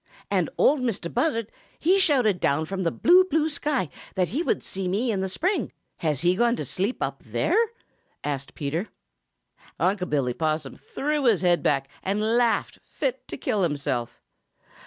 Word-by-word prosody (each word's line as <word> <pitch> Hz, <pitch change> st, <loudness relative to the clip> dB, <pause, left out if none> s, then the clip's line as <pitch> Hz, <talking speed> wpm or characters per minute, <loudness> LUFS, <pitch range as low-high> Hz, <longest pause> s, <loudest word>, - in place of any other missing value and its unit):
"And -, -, +2 dB
Ol' 295 Hz, -, +5 dB
Mistah 230 Hz, -10 st, -2 dB
Buzzard 235 Hz, -4 st, 0 dB, 0.3 s
he 370 Hz, +5 st, +3 dB
shouted 255 Hz, -, +3 dB
down 150 Hz, +3 st, +1 dB
from 190 Hz, +3 st, -4 dB
the 170 Hz, -, +2 dB
blue, 360 Hz, -, +5 dB
blue 320 Hz, -2 st, +1 dB
sky 290 Hz, -, -1 dB, 0.3 s
that 185 Hz, -1 st, +1 dB
he 280 Hz, +8 st, -1 dB
would -, -, 0 dB
see 190 Hz, -1 st, -3 dB
me 215 Hz, +7 st, 0 dB
in 200 Hz, -, -1 dB
the 190 Hz, 0 st, -1 dB
spring; 370 Hz, -, -1 dB, 0.3 s
has 150 Hz, -5 st, -1 dB
he 175 Hz, +1 st, +3 dB
gone 235 Hz, +3 st, +3 dB
to -, -, -4 dB
sleep 200 Hz, +7 st, -2 dB
up -, -, -3 dB
there?" -, -, 0 dB, 0.7 s
asked 140 Hz, -1 st, -4 dB
Peter. 155 Hz, +8 st, -2 dB, 0.9 s
Unc' 185 Hz, -1 st, +1 dB
Billy 135 Hz, -4 st, +1 dB
Possum 155 Hz, -1 st, -2 dB
threw 300 Hz, +1 st, -2 dB
back 260 Hz, -, +4 dB
his 205 Hz, -7 st, +2 dB
head 175 Hz, -2 st, +3 dB, 0.3 s
and 195 Hz, +2 st, -1 dB, 0.2 s
laughed 240 Hz, -1 st, +1 dB
fit -, -, -3 dB
to -, -, -6 dB
kill 205 Hz, -, -1 dB
himself. 140 Hz, -7 st, -1 dB
195 Hz, 170 wpm, -25 LUFS, 165-260 Hz, 0.9 s, Ol